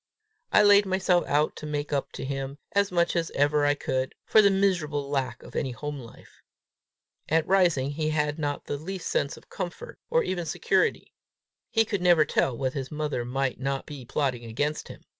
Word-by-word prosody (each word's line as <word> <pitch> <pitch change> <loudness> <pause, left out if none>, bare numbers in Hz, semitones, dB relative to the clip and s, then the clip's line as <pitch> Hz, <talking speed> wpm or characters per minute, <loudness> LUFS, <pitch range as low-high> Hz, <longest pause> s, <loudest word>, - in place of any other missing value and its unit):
I 210 - +6
laid 205 -1 +6
myself 185 -2 +2
out 150 +2 +1
to 155 - -7
make 145 -1 -3
up 140 - -1
to - - -5
him, 135 0 -4
as 200 -1 +2
much 170 0 +1
as 170 -1 0
ever 145 +1 +3
I 145 - +3
could, 130 -2 -2
for 215 - +6
the 200 - +5
miserable 175 -8 +1
lack 130 -4 -2
of - - -13
any 135 - -1
home 145 +4 -5
life. 115 -3 -14 0.9
At 160 +1 +3
Rising 170 -8 +3
he 155 +1 -1
had 150 0 0
not 145 -2 -2
the 145 - -3
least 185 +5 -5
sense 140 - 0
of - - -17
comfort 180 -3 -6
or 485 0 +3
even 175 - -3
security. - - 0 0.6
He 225 -1 +3
could 205 -3 -2
never 175 -4 +5
tell 130 -3 0
what 130 0 -1
his 135 -2 -4
mother 150 -5 -2
might 130 +1 -2
not 135 +1 -2
be 145 -4 -8
plotting 125 -1 -1
against 145 +7 -2
him. - - -11
150 Hz, 195 wpm, -27 LUFS, 135-175 Hz, 0.9 s, I